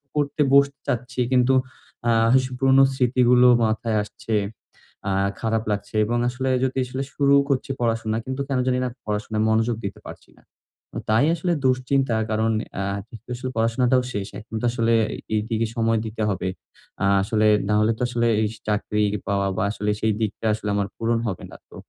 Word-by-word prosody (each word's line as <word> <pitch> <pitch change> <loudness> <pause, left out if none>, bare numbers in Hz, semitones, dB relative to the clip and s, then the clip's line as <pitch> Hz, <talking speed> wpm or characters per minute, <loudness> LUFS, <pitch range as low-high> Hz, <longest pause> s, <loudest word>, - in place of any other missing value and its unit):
করতে 145 0 0
বসতে 140 0 +4
চাচ্ছি। 125 +1 -2
কিন্তু 125 +1 +4 0.6
আ - - +4 0.2
কিছু 130 0 +2
পুরনো 135 +1 +5
স্মৃতিগুলো 125 -1 +4 0.2
মাথায় 110 0 0
আসছে। 110 +2 -7 0.8
আ - - 0 0.3
খারাপ 110 0 0
লাগছে 105 +1 -4
এবং 120 +2 -1
আসলে 130 +2 -3
যদি 130 0 -1
আসলে 130 +2 -4
শুরু 140 -1 +3 0.2
করছি 135 -1 0
পড়াশোনা, 115 -2 0
কিন্তু 130 +1 -3
কেন 135 -2 -1
জানি 125 0 +2
না? 125 - -1 0.2
পড়াশোনায় 105 +1 -2
মনোযোগ 115 +1 +2
দিতে 100 - -5
পারছি - - -11
না। - - -21 0.7
তাই 110 +5 +4
আসলে 175 +1 -1
দুশ্চিন্তা 130 -1 +1 0.2
কারন 110 +1 +1 0.3
আ - - -1 0.2
ঠিক 115 - -11
তো - - -22
আসলে 130 +1 -5
পড়াশোনাটাও 120 +3 +2
শেষ। 100 -1 -3
এখন 110 +1 -10
তো - - -1
আসলে 115 -1 +1 0.4
এইদিকে 110 +1 -1
সময় 115 -1 +1
দিতে 110 0 -5
হবে। 95 -2 -2 0.6
আ - - +3 0.2
আসলে 110 +1 +2 0.2
নাহলে 105 +1 +3
তো - - -9
আসলে 120 -1 0
এই 110 - +2 0.2
চাকরি 105 0 0 0.3
পাওয়া, 100 -1 +1
বা - - +1
আসলে 105 -1 -3
সেই 110 -1 +2
দিকটা 110 +1 -3
আসলে 105 0 -4
আমার 100 -1 0
পূরণ 115 0 0
হবে 95 -4 -4
না। - - -11
তো, - - -14
115 Hz, 175 wpm, -23 LUFS, 110-130 Hz, 0.8 s, পুরনো